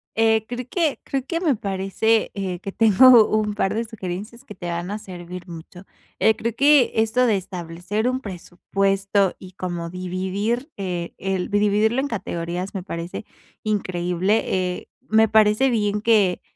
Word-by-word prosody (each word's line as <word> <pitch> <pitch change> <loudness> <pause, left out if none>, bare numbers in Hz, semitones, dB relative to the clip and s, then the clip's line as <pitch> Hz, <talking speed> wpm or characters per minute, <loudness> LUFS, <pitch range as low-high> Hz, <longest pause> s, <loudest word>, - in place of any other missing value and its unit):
Eh, 220 -1 +3
creo 245 0 -5
que 325 -5 0
creo 270 -2 -3
que 335 +3 -2
me 320 -7 +2
parece, 200 +3 0
eh, 185 -3 -3
que 195 - -6
tengo 225 +2 +7
un 215 -1 0
par 195 -2 0
de 230 +2 -1
sugerencias 215 +2 -7
que 210 - -10
te 175 -2 -6
van 175 +2 -3
a 210 - -3
servir 180 -1 -9
mucho. 175 +2 -11 0.3
Eh, 220 0 +4
creo 230 -1 -3
que 285 -2 +5
esto 225 +3 +2
de 220 -4 +3
establecer 180 +4 -4
un 255 +1 0
presupuesto 195 +1 -1
y 185 0 -12
como 175 -2 -4
dividir, 190 - -3
eh, 180 -3 -4
el 190 -1 -2
vi 205 - +1
dividirlo 210 +4 +2
en 280 - 0
categorías 180 -3 -4
me 185 - -3
parece 170 +3 -6 0.4
increíble, 185 -1 0
eh, 180 -1 -2 0.2
me 220 +1 +5
parece 220 +4 +4
bien 210 -2 0
que, 210 -5 +3
200 Hz, 165 wpm, -22 LUFS, 180-225 Hz, 0.4 s, tengo